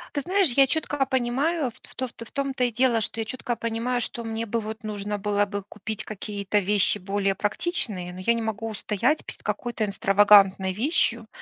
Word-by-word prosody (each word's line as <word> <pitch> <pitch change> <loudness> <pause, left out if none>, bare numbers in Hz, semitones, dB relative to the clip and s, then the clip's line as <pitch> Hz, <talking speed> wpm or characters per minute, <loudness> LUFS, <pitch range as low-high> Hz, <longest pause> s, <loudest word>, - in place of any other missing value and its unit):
Ты 285 - +1
знаешь, 375 0 +2
я 270 +2 +5
четко 290 -1 0
понимаю, 265 +3 0
в - - -15
то 260 - -1
в 230 -1 -10
том-то 275 -2 -1
и 245 - 0
дело, 240 0 +2
что 225 +1 -3
я - - -3
четко 240 +1 -3
понимаю, 230 +2 -1
что 235 0 -5
мне 225 0 -3
бы, 230 +2 -1
вот, 220 +1 -6
нужно 210 -1 -3
было 205 0 +1
бы 200 0 -5
купить 210 +1 -6
какие-то 205 -1 -2
вещи 205 +1 +3
более 195 0 0
практичные, 205 - -2
но 180 - -9
я 235 +5 +2
не 230 - -2
могу 225 0 -3
устоять 215 +7 0
перед - - -9
какой-то 235 -3 -2
экстравагантной 195 -2 +5
вещью, 235 - +1
225 Hz, 190 wpm, -25 LUFS, 205-245 Hz, -, я